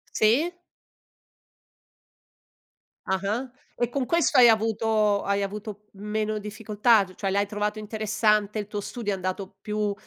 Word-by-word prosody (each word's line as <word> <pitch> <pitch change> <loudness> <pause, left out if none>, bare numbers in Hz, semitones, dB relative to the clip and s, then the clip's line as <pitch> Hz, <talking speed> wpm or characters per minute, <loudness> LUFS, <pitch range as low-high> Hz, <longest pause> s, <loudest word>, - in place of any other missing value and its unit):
Sì? 255 +11 +3 2.5
Ah-ah. 200 +7 -1 0.3
E 240 -1 0
con 265 0 -1
questo 335 -3 +2
hai 240 -2 +9
avuto 220 -1 +2
hai 200 0 0
avuto 210 +1 -6
meno 215 +1 -2
difficoltà? 210 +1 +2
C 185 - -15
cioè, 195 - -2
l'hai 200 +1 +1
trovato 210 +1 -3
interessante? 215 0 0
Il 205 - -4
tuo 210 -1 -4
studio 220 -1 -4
è - - -1
andato 185 +1 -5
più 210 -1 -1
210 Hz, 130 wpm, -26 LUFS, 200-220 Hz, 2.5 s, hai